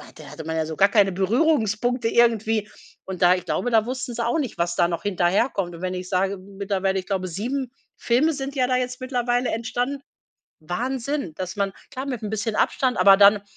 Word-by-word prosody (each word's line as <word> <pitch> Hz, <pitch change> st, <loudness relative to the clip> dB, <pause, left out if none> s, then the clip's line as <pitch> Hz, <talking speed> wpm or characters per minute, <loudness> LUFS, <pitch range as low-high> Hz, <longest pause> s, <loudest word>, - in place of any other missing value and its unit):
da -, -, -12 dB
hatte 160 Hz, -, -9 dB
man 160 Hz, 0 st, -3 dB
ja 160 Hz, -, 0 dB
so 160 Hz, 0 st, -5 dB
gar 195 Hz, +1 st, +5 dB
keine 200 Hz, -3 st, +4 dB
Berührungspunkte 230 Hz, -, +1 dB
irgendwie. 225 Hz, -2 st, +2 dB, 0.4 s
Und 190 Hz, -1 st, -7 dB
da 180 Hz, +1 st, +7 dB
ich 180 Hz, -, -6 dB
glaube, 245 Hz, -, -1 dB
da 220 Hz, -1 st, +4 dB
wussten 255 Hz, 0 st, -4 dB
sie 235 Hz, 0 st, -2 dB
auch 240 Hz, -, +1 dB
nicht, 265 Hz, -6 st, -4 dB
was 175 Hz, 0 st, 0 dB
da -, -, +3 dB
noch 170 Hz, -1 st, -3 dB
hinterherkommt. 185 Hz, -1 st, 0 dB
Und, 165 Hz, -, -11 dB
wenn 185 Hz, 0 st, -2 dB
ich 180 Hz, 0 st, -6 dB
sage 190 Hz, +1 st, 0 dB
mittlerweile, 195 Hz, 0 st, -2 dB
ich 185 Hz, -, -9 dB
glaube, 190 Hz, -2 st, -2 dB
7 245 Hz, +8 st, -3 dB, 0.3 s
Filme 255 Hz, +7 st, +2 dB
sind 275 Hz, 0 st, -5 dB
ja 255 Hz, -2 st, +2 dB
da 255 Hz, 0 st, +2 dB
jetzt 250 Hz, +1 st, -3 dB
mittlerweile 245 Hz, -1 st, 0 dB
entstanden. 245 Hz, +4 st, -2 dB, 0.6 s
Wahnsinn, 245 Hz, -, -3 dB
dass 185 Hz, +2 st, -5 dB
man 200 Hz, -1 st, -1 dB, 0.2 s
klar, 260 Hz, +2 st, -5 dB
mit 250 Hz, -5 st, -4 dB
‘n 210 Hz, -, -4 dB
bisschen 215 Hz, 0 st, -2 dB
Abstand, 255 Hz, -2 st, +1 dB
aber 195 Hz, -1 st, +6 dB
dann, 200 Hz, 0 st, +6 dB
215 Hz, 210 wpm, -23 LUFS, 190-250 Hz, 0.6 s, da